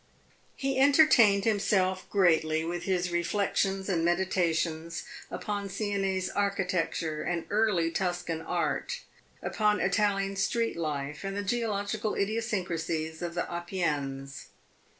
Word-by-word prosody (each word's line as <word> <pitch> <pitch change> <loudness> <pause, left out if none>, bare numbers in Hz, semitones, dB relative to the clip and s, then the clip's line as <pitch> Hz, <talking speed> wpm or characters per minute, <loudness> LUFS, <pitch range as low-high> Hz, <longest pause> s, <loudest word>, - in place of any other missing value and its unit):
He 270 -1 -1
entertained 265 -8 +6
himself 195 -3 +1
greatly 160 -4 +3
with 175 +1 -3
his 180 -2 0
reflections 195 +2 0
and 175 -5 +1
meditations 170 -2 0 0.3
upon 205 -2 -3
Sienese 195 -2 -1
architecture 185 -5 0
and 170 -2 -2
early 205 -6 +2
Tuscan 175 -3 -2
art, 165 - -2 0.4
upon 210 -1 +1
Italian 195 -2 +1
street 230 +4 0
life 150 -2 -3
and 195 0 -3
the 205 - -1
geological 215 0 -1
idiosyncrasies 175 -7 -2
of 170 -1 -4
the 175 - 0
Apennines. 145 -6 -3
185 Hz, 110 wpm, -29 LUFS, 165-205 Hz, 0.4 s, entertained